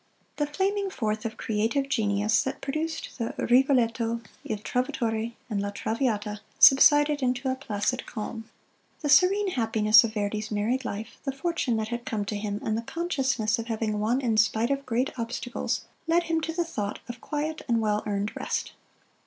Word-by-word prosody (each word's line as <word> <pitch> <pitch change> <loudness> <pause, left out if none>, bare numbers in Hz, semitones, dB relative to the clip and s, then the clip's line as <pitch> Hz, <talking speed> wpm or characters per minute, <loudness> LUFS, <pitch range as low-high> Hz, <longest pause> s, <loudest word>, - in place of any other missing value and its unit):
The 295 - 0
flaming 390 +6 0
forth 215 - -2
of 220 -1 -4
creative 225 +6 0
genius 210 -4 +2
that 265 - -4
produced 310 +1 -4
the 230 - -3
"Rigoletto," 235 -3 +2 0.2
"Il 215 - -3
Trovatore," 230 0 -2
and 210 -4 -2
"La 200 - -2
Traviata," 210 -1 -2 0.2
subsided 290 +1 +7
into 255 +1 0
a - - -1
placid 250 -1 -2
calm. 225 +1 -6 0.5
The 295 - -2
serene 385 +6 +5
happiness 220 -6 +5
of 225 -1 -3
Verdi's 210 +1 -2
married 225 +5 -1
life, 215 +1 -6
the 275 - -1
fortune 270 -4 -1
that 220 0 -2
had 240 0 -4
come 215 -4 -2
to 210 - -3
him, 205 0 -3
and 215 - 0
the 225 - -1
consciousness 265 - -1
of 230 - -5
having 220 -2 -1
won 235 +5 +1
in 230 -4 +1
spite 220 +3 +3
of 275 -1 -2
great 250 +3 0
obstacles, 240 +2 -3 0.2
led 340 +1 +3
him 330 -1 0
to 325 - -2
the 340 +1 -1
thought 210 -11 -3
of 240 -1 -8
quiet 310 +1 -3
and 235 -2 +2
well 210 -1 +1
earned 205 0 -2
rest. - - -3
235 Hz, 175 wpm, -27 LUFS, 215-275 Hz, 0.5 s, subsided